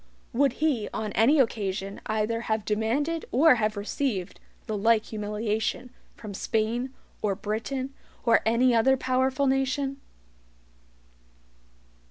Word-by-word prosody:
Would 275 0 +3
he 275 -7 0
on 215 -1 -2
any 235 +10 +4
occasion 200 -5 -1
either 220 +1 0
have 220 -1 0
demanded 255 +10 0
or 285 +1 +6
have 215 0 0
received 205 -2 -2 0.3
the 215 - -3
like 225 +2 +3
humiliation 215 +3 -2 0.2
from 210 -3 -8
Spain, 225 +6 -1 0.3
or 200 -2 0
Britain, 255 +7 -3 0.3
or 230 -1 +5
any 240 +3 +3
other 265 +4 +4
POWERFUL 260 +2 +1
nation? 270 +1 0
230 Hz, 115 wpm, -27 LUFS, 215-265 Hz, 0.3 s, or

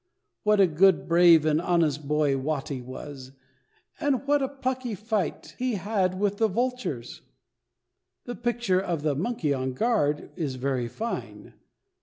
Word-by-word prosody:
What 210 -1 +3
a 195 - +7
good, 185 +2 +3
brave, 170 -2 +6
and 155 +1 +2
honest 155 -5 +1
boy 150 -2 +2
Watty 135 -1 -3
was, 130 +1 -9 0.7
and 280 -2 0
what 290 0 +3
a 270 - 0
plucky 260 -4 -3
fight 215 0 -3
he 250 -2 0
had 190 -2 -1
with 205 0 0
the 225 - +3
vultures! 235 - -3 1.0
The 245 - -4
picture 235 -6 0
of 170 -6 -3
the 150 -2 +1
"Monkey 160 - -1
on 130 -1 -2
Guard" 150 - 0
is 150 -7 -3
very 130 -2 -1
fine. 225 - -6
180 Hz, 145 wpm, -26 LUFS, 145-230 Hz, 1.0 s, a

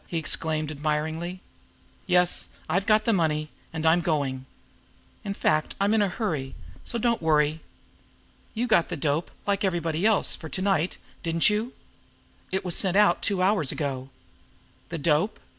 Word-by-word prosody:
he 170 - -3
exclaimed 155 -1 -1
admiringly. 155 +4 -2 0.7
"Yes; 180 -1 +2 0.2
I've 190 +2 0
got 215 0 +4
the 230 - +3
money 155 -4 0 0.2
and 160 -1 -4
I'm 165 +2 +5
going. 135 -6 -1 0.8
In 200 -1 -3
fact, 155 -5 +1
I'm 200 +2 +2
in 220 - +4
a 205 - +3
hurry, 160 - -3 0.3
so 235 - -2
don't 235 -2 +1
worry! 155 -1 +2 1.0
You 235 +3 0
got 215 -8 +3
the 175 - -3
dope, 150 +3 0 0.2
like 200 0 0
everybody 170 -3 0
else, 215 -1 +3
for 160 - -9
to 185 - -4
night, 190 -4 +1 0.2
didn't 165 +4 +2
you? 220 +4 -1 0.8
It 190 0 -1
was 180 - 0
sent 190 -1 +1
out 210 0 +4
two 190 -2 +1
hours 185 -8 +2
ago." 135 -3 -3 0.8
The 165 - -4
dope! 160 +7 +1
170 Hz, 160 wpm, -26 LUFS, 155-200 Hz, 1.0 s, I'm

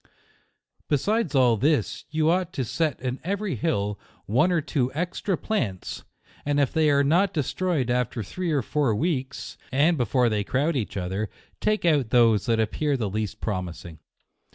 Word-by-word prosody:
Be 145 - +4
sides 205 - 0
all 125 -4 +4
this, 145 +7 0
you 155 0 +1
ought 180 0 -1
so 130 - 0
set 155 +5 -1
in 130 0 -3
every 200 +2 -2
hill, 105 -11 -1 0.3
one 130 - +3
or 175 - +3
two 140 -5 -1
extra 175 +3 -1
plants, 115 - -3 0.4
and 145 0 +1
if 140 -3 +1
they 160 -1 +3
are 140 0 +4
not 175 +7 +3
destroyed 150 -3 0
after 125 -1 -1
three 180 - -4
or 145 -3 +1
four 140 -7 +1
weeks, 135 -2 -3
and 150 +4 +3
be - - +2
130 - - +2
JUNE. - - -16
fore 125 -3 +4
they 105 -2 0
crowd 145 +9 0
each 110 -5 -2
other, 95 +3 -2 0.3
take 215 -3 0
out 145 -8 +3
those 115 -4 +4
that 115 -1 +2
appear 140 +6 0
the 110 -5 -2
least 105 0 -3
promising. 90 -5 -4
135 Hz, 180 wpm, -25 LUFS, 110-160 Hz, 0.4 s, Be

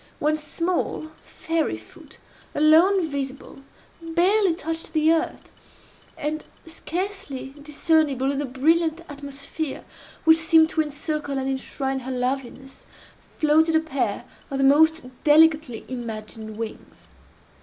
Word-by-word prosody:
One 300 +1 +1
small, 315 +1 -2
fairy 325 -1 -2
foot, - - -15 0.4
alone 325 +5 +5
visible, 280 -2 -6 0.4
barely 350 +3 +2
touched 325 0 -5
the 315 0 +4
earth; 330 +2 -3 0.7
and, 305 +1 -3 0.2
scarcely 330 -5 -5
discernible 290 -3 +1
in 280 - -2
the 290 - -1
brilliant 320 +5 +1
atmosphere 280 +1 -5 0.4
which 320 0 +6
seemed 320 0 +5
to 315 - +2
encircle 295 -1 -3
and 265 0 -2
enshrine 270 0 -2
her 260 +1 -6
loveliness, 260 +1 -4 0.5
floated 320 +2 +3
a - - +6
pair 315 -4 -2 0.2
of 275 - -3
the 270 - +1
most 315 +2 +4 0.2
delicately 310 -5 +4
imagined 220 -3 -6
wings. 225 -1 -8
305 Hz, 115 wpm, -24 LUFS, 270-325 Hz, 0.7 s, which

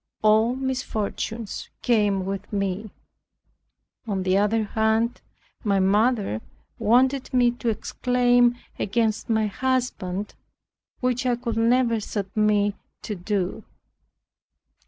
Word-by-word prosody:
All 220 +3 +4
misfortunes 235 -4 -3
came 205 -5 +2
with 195 0 -5
me." 200 +1 -2 1.2
On 195 -3 -1
the 185 0 +2
other 210 +3 +2
hand 220 +2 0 0.4
my 200 -3 +2
mother 205 - +2 0.4
wanted 255 +4 +3
me 245 -1 +4
to 240 -1 -3
exclaim 245 +2 +2 0.2
against 220 +2 0
my 220 -1 +2
husband 215 -5 -2 0.7
which 255 +1 0
I 245 - +3
could 235 -2 -4
never 230 0 +3
submit 205 0 0 0.3
to 215 - -3
do. 195 +2 -2
220 Hz, 100 wpm, -24 LUFS, 205-245 Hz, 1.2 s, All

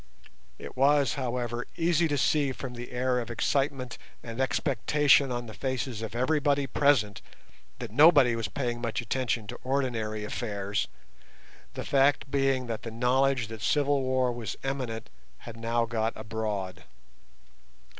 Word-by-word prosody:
It - - -9
was, 140 -1 +3
however, 120 -2 -3
easy 170 0 +2
to 145 -2 -1
see 140 +2 +2
from 130 -1 -7
the 120 0 -8
air 125 0 0
of 120 -1 -5
excitement 130 0 -1 0.2
and 115 +2 -4
expectation 140 +1 +3
on 120 0 -3
the 110 - -9
faces 130 -3 -3
of 110 0 -6
everybody 145 +2 +2
present 120 -8 +2 0.6
that - - -7
nobody 145 -2 +6
was 115 -2 -2
paying 120 +2 -3
much 115 -2 -2
attention 120 -2 -1
to - - -8
ordinary 120 -5 -1
affairs, 100 -2 -2 0.9
the - - -5
fact 140 0 +2
being 135 -2 +1
that 115 -2 -4
the 115 - -6
knowledge 125 +1 +1
that 110 -2 -8
civil 145 +3 +2
war 130 -1 +1
was 115 -5 -5
imminent 130 -5 -3 0.3
had 115 - -10
now 115 +1 0
got 115 -1 -1
abroad. 105 -4 -4
125 Hz, 145 wpm, -28 LUFS, 115-135 Hz, 0.9 s, nobody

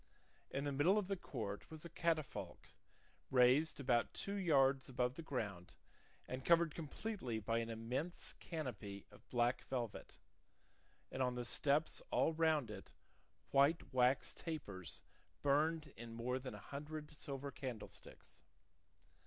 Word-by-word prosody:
In 135 - -2
the 145 - 0
middle 150 +9 +4
of 205 -3 +1
the 195 - 0
court 105 - -5
was 160 +1 -9
a - - -6
catafalque, 165 -4 -1 0.6
raised 130 +5 +5
about 125 -4 +2
two 200 - -2
yards 140 -9 +4
above 125 -1 +1
the 165 - -6
ground 105 - -4 0.5
and 130 +1 -4
covered 170 -1 +5
completely 160 - -3
by 115 +2 +1
an 115 0 -2
immense 125 +10 -3
canopy 120 - -5
of - - -18
black 120 0 +2
velvet, 120 -5 -4 0.9
and 130 - -2
on 125 -1 +2
the 120 -1 -2
steps 145 +5 +2
all 165 - +3
round 160 -5 +3
it - - -9 0.6
white 140 +3 +4
wax 125 +1 +3
tapers 100 - -5 0.4
burned 150 +1 +2
in 115 0 -8
more 125 +3 -1
than 130 0 -6
a - - -12
hundred 150 +1 -5
silver 140 -1 -4
candlesticks. 125 -4 -7
135 Hz, 135 wpm, -40 LUFS, 120-155 Hz, 0.9 s, raised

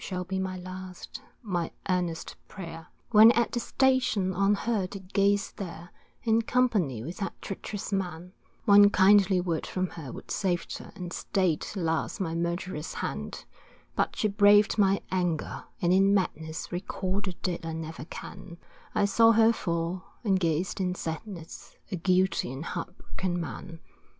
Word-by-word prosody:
Shall 180 -2 -3
be 190 +1 -3
my 190 -1 -3
last, 185 0 -8 0.2
my 175 -6 -1 0.2
earnest 175 -3 -1
prayer. 165 -4 -8 0.2
When 220 +1 +9
at 235 -1 +1
the 240 - -1
station 245 -8 +2
on 195 +2 +3
her 210 -3 -1
did 190 0 -10
gaze 200 0 +2
there, 175 -2 -8 0.3
In 225 0 +3
company 210 - +1
with 170 +7 -6
that 195 - -4
treacherous 200 +1 -5
man, 180 -2 -3 0.3
One 205 0 +8
kindly 195 -1 +5
word 170 -3 -2
from 185 -1 -1
her 150 -7 -8
would - - -9
saved 180 -4 -1
her - - -11
And 175 -2 -6
stay'd 185 -5 0
alas 165 +1 -1
my 165 -4 -1
murderous 170 -1 -3
hand; - - -4 0.5
But - - 0
she 215 - +1
braved 205 +1 +5
my 195 -1 +3
anger, 180 -4 -1 0.2
and 175 +1 +4
in 195 +1 +5
madness, 160 -4 -2
Recall 190 +2 -2
the 190 -2 -4
dead 175 -1 -3
I 165 0 -4
never 160 -1 -6
can, 170 0 -9 0.4
I - - +3
saw 225 +3 +5
her 225 +1 +5
fall, 170 -2 -2 0.2
and 195 -4 +2
gazed 170 +2 0
in 180 -1 0
sadness, 165 +1 -7 0.2
A - - 0
guilty 180 -4 +1
and 135 +5 -6
heartbroken 180 +1 -4
man. 170 0 -7
185 Hz, 155 wpm, -28 LUFS, 170-200 Hz, 0.5 s, When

